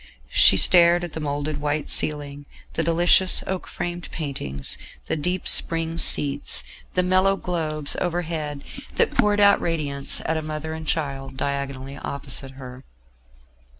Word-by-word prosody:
She -, -, +6 dB
stared 175 Hz, -1 st, +6 dB
at 175 Hz, -, -6 dB
the -, -, -5 dB
moulded 145 Hz, 0 st, -3 dB
white 145 Hz, 0 st, -2 dB
ceiling, 145 Hz, -1 st, -1 dB, 0.3 s
the -, -, -1 dB
delicious 175 Hz, +2 st, +4 dB
oak 190 Hz, -1 st, -4 dB
framed 175 Hz, 0 st, -5 dB
paintings, 70 Hz, -, -5 dB, 0.3 s
the -, -, -2 dB
deep 180 Hz, +4 st, -2 dB
spring 165 Hz, 0 st, +1 dB
seats, 145 Hz, -3 st, +2 dB, 0.3 s
the 180 Hz, -, +2 dB
mellow 185 Hz, +2 st, +3 dB
globes 155 Hz, -6 st, -2 dB
overhead 160 Hz, -5 st, -3 dB, 0.3 s
that -, -, +2 dB
poured 210 Hz, 0 st, +2 dB
out 200 Hz, 0 st, +5 dB
radiance, 145 Hz, -4 st, 0 dB
at 160 Hz, -, 0 dB
a -, -, -2 dB
mother 155 Hz, +1 st, -5 dB
and 160 Hz, 0 st, -8 dB
child 135 Hz, -4 st, -3 dB
diagonally 140 Hz, 0 st, -4 dB
opposite 135 Hz, -1 st, -4 dB
her. 130 Hz, -1 st, -11 dB
155 Hz, 140 wpm, -23 LUFS, 140-175 Hz, 0.3 s, She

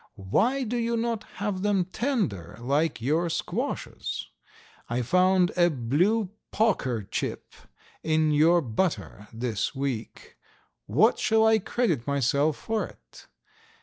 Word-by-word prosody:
Why 210 Hz, -, +1 dB
do 240 Hz, +1 st, -2 dB
you 235 Hz, 0 st, 0 dB
not 230 Hz, -1 st, -2 dB
have 200 Hz, -1 st, -2 dB
them 200 Hz, -3 st, +2 dB
tender 185 Hz, -, -2 dB
like 140 Hz, +3 st, 0 dB
your 160 Hz, +7 st, +1 dB
squashes? -, -, -3 dB, 0.6 s
I 120 Hz, +1 st, -1 dB
found 180 Hz, +6 st, +3 dB
a 175 Hz, -1 st, +4 dB
blue 175 Hz, -, +1 dB, 0.2 s
poker 130 Hz, -, +1 dB
chip -, -, -4 dB, 0.5 s
in 155 Hz, -1 st, +2 dB
your 165 Hz, +4 st, +5 dB
butter 115 Hz, -, -2 dB
this 115 Hz, 0 st, -2 dB
week. 130 Hz, -4 st, -5 dB, 0.5 s
What -, -, +3 dB
shall 220 Hz, 0 st, +3 dB
I 220 Hz, 0 st, +5 dB
credit 185 Hz, -, -1 dB
myself 140 Hz, +2 st, +1 dB
for 220 Hz, -1 st, -2 dB
it? -, -, -17 dB
170 Hz, 120 wpm, -27 LUFS, 125-210 Hz, 0.6 s, your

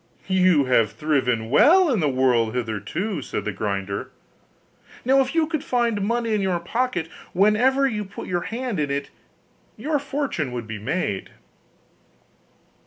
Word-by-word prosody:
'You 185 Hz, -6 st, +3 dB
have 115 Hz, -5 st, +2 dB
thriven 125 Hz, -7 st, 0 dB
well 340 Hz, -, +6 dB
in 230 Hz, -, +1 dB
the 150 Hz, -4 st, +2 dB
world 125 Hz, -3 st, +2 dB
hitherto,' 120 Hz, -, -3 dB
said -, -, -4 dB
the 105 Hz, -, -1 dB
grinder, 100 Hz, -1 st, -3 dB, 1.0 s
'now 270 Hz, +2 st, +5 dB
if 265 Hz, +3 st, -2 dB
you 325 Hz, -1 st, +3 dB
could 310 Hz, -2 st, -3 dB
find 235 Hz, -4 st, 0 dB
money 230 Hz, +2 st, 0 dB
in 210 Hz, -, +1 dB
your 185 Hz, -3 st, 0 dB
pocket 200 Hz, -1 st, -1 dB, 0.3 s
whenever 235 Hz, +8 st, +3 dB
you 215 Hz, -6 st, -1 dB
put 195 Hz, 0 st, -9 dB
your 175 Hz, -1 st, -1 dB
hand 235 Hz, -4 st, -3 dB
in 145 Hz, -1 st, 0 dB
it, 140 Hz, 0 st, -3 dB, 0.7 s
your 300 Hz, -1 st, -1 dB
fortune 275 Hz, -, -3 dB
would 120 Hz, -2 st, -4 dB
be 110 Hz, -1 st, -6 dB
made. 105 Hz, -, -2 dB
185 Hz, 150 wpm, -23 LUFS, -, 1.0 s, well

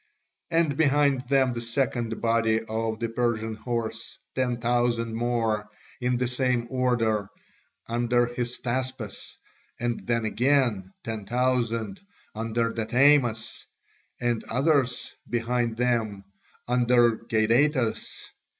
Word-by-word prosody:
And 165 Hz, -4 st, +1 dB
behind 145 Hz, -3 st, +3 dB
them 135 Hz, -2 st, +3 dB
the 120 Hz, -, -4 dB
second 115 Hz, -1 st, -1 dB
body 115 Hz, -1 st, +2 dB
of 110 Hz, 0 st, -2 dB
the 115 Hz, -, -1 dB
Persian 115 Hz, -1 st, -1 dB
horse, 115 Hz, 0 st, -4 dB, 0.2 s
ten 125 Hz, -2 st, 0 dB
thousand 120 Hz, -1 st, +1 dB
more, 115 Hz, -3 st, 0 dB, 0.3 s
in 125 Hz, 0 st, +1 dB
the 125 Hz, 0 st, 0 dB
same 125 Hz, -1 st, 0 dB
order, 115 Hz, -6 st, +1 dB, 0.6 s
under 120 Hz, +1 st, +2 dB
Hystaspas, 120 Hz, -1 st, -4 dB, 0.4 s
and 120 Hz, 0 st, -2 dB
then 115 Hz, -1 st, +1 dB
again 120 Hz, -5 st, +1 dB
ten 110 Hz, -3 st, -5 dB
thousand 125 Hz, -, 0 dB, 0.3 s
under 115 Hz, +1 st, -1 dB
Datamas, 120 Hz, 0 st, +2 dB, 0.5 s
and 120 Hz, -2 st, 0 dB
others 130 Hz, -1 st, +1 dB, 0.2 s
behind 120 Hz, -1 st, 0 dB
them 115 Hz, -5 st, 0 dB, 0.4 s
under 120 Hz, -1 st, +4 dB
Gadatas. 115 Hz, +3 st, +1 dB
120 Hz, 105 wpm, -26 LUFS, 115-125 Hz, 0.6 s, under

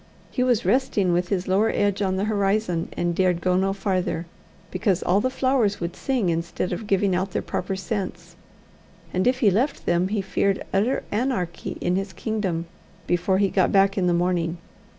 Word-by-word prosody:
He 250 Hz, -, -1 dB
was 245 Hz, -3 st, +2 dB
resting 215 Hz, -8 st, +2 dB
with 175 Hz, +1 st, 0 dB
his 190 Hz, -2 st, -1 dB
lower 200 Hz, +4 st, +3 dB
edge 205 Hz, -2 st, 0 dB
on 190 Hz, -1 st, +1 dB
the 190 Hz, -, -1 dB
horizon, 200 Hz, -4 st, 0 dB
and 175 Hz, 0 st, 0 dB
dared 180 Hz, -1 st, +2 dB
go 180 Hz, +1 st, +1 dB
no 190 Hz, +1 st, +2 dB
farther, 185 Hz, -4 st, -1 dB, 0.5 s
because 185 Hz, 0 st, 0 dB
all 190 Hz, +3 st, +3 dB
the 255 Hz, -, +1 dB
flowers 255 Hz, -6 st, +1 dB
would 170 Hz, +1 st, -4 dB
sing 245 Hz, -7 st, 0 dB
instead 170 Hz, +2 st, -2 dB
of 210 Hz, +4 st, -5 dB
giving 195 Hz, -1 st, +2 dB
out 185 Hz, +1 st, -1 dB
their -, -, -1 dB
proper 190 Hz, +2 st, -3 dB
scents, 195 Hz, 0 st, -5 dB, 0.8 s
and 185 Hz, +5 st, +1 dB
if 255 Hz, +1 st, +1 dB
he 210 Hz, -5 st, +5 dB
left 255 Hz, +9 st, 0 dB
them, 175 Hz, +1 st, +2 dB
he 210 Hz, +2 st, -1 dB
feared 195 Hz, +1 st, 0 dB
utter 215 Hz, +7 st, +1 dB
anarchy 210 Hz, -7 st, -2 dB
in 180 Hz, +1 st, +1 dB
his 195 Hz, 0 st, -3 dB
kingdom 195 Hz, -7 st, -2 dB, 0.4 s
before 175 Hz, +2 st, +1 dB
he 200 Hz, 0 st, +2 dB
got 185 Hz, -, +2 dB
back 195 Hz, 0 st, +4 dB
in 185 Hz, -2 st, +1 dB
the -, -, +3 dB
morning. 175 Hz, -1 st, 0 dB
195 Hz, 190 wpm, -24 LUFS, 180-210 Hz, 0.8 s, he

